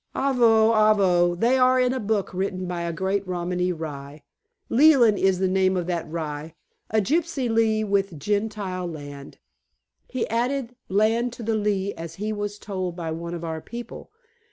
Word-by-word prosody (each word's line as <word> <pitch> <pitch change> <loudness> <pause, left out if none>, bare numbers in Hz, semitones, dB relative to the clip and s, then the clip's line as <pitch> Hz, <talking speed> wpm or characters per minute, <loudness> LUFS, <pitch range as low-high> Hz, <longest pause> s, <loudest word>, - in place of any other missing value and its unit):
"Avo! 230 -4 +4
Avo! 190 -5 +3
They 245 +4 +3
are 255 0 +4
in 250 0 +2
a 260 - -2
book 210 -3 -1
written 185 0 -2
by 175 -1 -3
a 170 0 -2
great 190 +4 -1
Romany 180 0 -1
Rye. 150 -3 -7 0.4
Leland 245 -6 +5
is 190 -1 +3
the 190 +1 +1
name 185 0 +2
of 175 - -1
that 170 -3 -3
rye, 155 -1 -5 0.3
a 220 - +2
gypsy 295 - 0
Lee 225 -1 +2
with 195 -4 0
Gentile 205 -1 -2
land. 145 -4 -9 0.7
He 255 -3 -2
added 245 +2 -1
land 220 +5 +2
to 240 - -8
the 225 +1 0
lea 205 -2 0
as 165 0 -8
he 215 +3 -3
was 205 0 -4
told 185 -4 -4
by 165 -2 -4
one 170 +2 -5
of 170 - -7
our 160 -1 -4
people. 235 +4 -9
200 Hz, 170 wpm, -24 LUFS, 175-225 Hz, 0.7 s, Leland